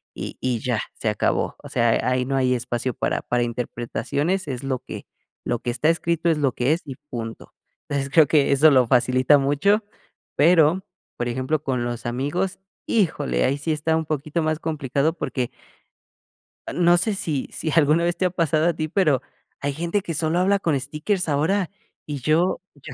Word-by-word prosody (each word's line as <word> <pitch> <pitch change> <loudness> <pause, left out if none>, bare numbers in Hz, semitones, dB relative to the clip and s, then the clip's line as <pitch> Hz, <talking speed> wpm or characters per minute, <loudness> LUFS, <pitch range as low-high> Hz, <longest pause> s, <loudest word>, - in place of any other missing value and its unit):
y - - -6
y 125 -3 0
ya 125 -2 -1
se 110 - -5
acabó. 105 - 0
O - - -10
sea, 115 -1 +2
ahí 125 0 +1
no 135 +1 -1
hay 130 -1 +2
espacio 120 +1 -2
para - - -1
para 120 0 0
interpretaciones, 125 +9 -2
es 130 -1 -4
lo 135 -2 -1
que, - - -9 0.4
lo 120 -1 -1
que 120 - -4
está 125 +6 +1
escrito 170 0 +1
es 160 - +2
lo 140 -3 +2
que 125 +5 +1
es 170 - -2
y 135 -2 -7 0.2
punto. 115 -2 -6 0.4
Entonces, 140 -1 -1
creo 160 - +7
que 145 -1 +3
eso 150 +2 +6
lo 130 -3 +4
facilita 130 +3 +4
mucho. 165 +11 +2 0.5
Pero, 165 +3 +4 0.3
por 120 - -2
ejemplo, 130 +5 -1
con 130 -4 -1
los 120 -1 -4
amigos, 145 +10 -2 0.3
híjole, 175 -9 +1
ahí 135 +2 +1
sí 155 +2 -1
está 160 +1 0
un 160 - -2
poquito 155 +2 -2
más 155 0 0
complicado 150 -1 0
porque 130 -7 -3 1.2
no 175 0 +4
sé, 205 +4 0
si 150 -8 -2
si 160 - -3
alguna 155 +1 +4
vez 170 0 +1
te 185 - +1
ha - - +3
pasado 165 -2 +1
a 175 - +2
ti, 155 0 -3
pero, 155 -8 +2 0.4
hay 140 0 -2
gente 170 +6 -1
que 170 - -5
solo 160 +2 +1
habla 195 +2 +3
con 155 -7 0
stickers 155 +7 -2
ahora 165 +6 +1 0.4
y 145 -2 -4
yo 165 +7 +2
yo 140 -3 -10
150 Hz, 190 wpm, -23 LUFS, 130-165 Hz, 1.2 s, creo